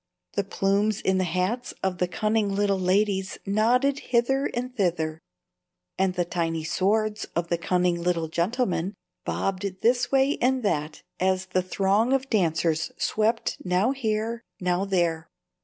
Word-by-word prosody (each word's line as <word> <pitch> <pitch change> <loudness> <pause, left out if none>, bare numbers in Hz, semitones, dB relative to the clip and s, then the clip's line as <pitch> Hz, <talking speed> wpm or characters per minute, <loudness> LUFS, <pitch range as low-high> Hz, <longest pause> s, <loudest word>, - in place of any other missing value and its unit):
The - - 0
plumes 200 +2 +1
in 190 0 +1
the 185 - +1
hats 185 +9 -1
of 185 -2 -1
the 180 - +2
cunning 210 +1 0
little 200 -1 +1
ladies 190 +1 +1
nodded 245 +7 +2
hither 265 +3 +1
and 250 +1 -4
thither, 160 -6 0 0.8
and 190 -1 +1
the 175 -1 +1
tiny 165 -2 -2
swords 210 +5 0
of 170 0 -1
the 170 - +1
cunning 180 0 +1
little 170 -2 0
gentlemen 185 +2 -1 0.3
bobbed 190 -1 -2
this 245 +1 +2
way 275 +1 +3
and 255 0 +2
that 150 -6 -1 0.2
as 185 0 +1
the 185 0 0
throng 200 +6 +1
of 270 0 0
dancers 165 -5 +1
swept 220 +2 0
now 185 +7 +2
here, 230 -3 -2 0.2
now 180 +1 0
there. 170 -4 0
195 Hz, 145 wpm, -26 LUFS, 180-225 Hz, 0.8 s, way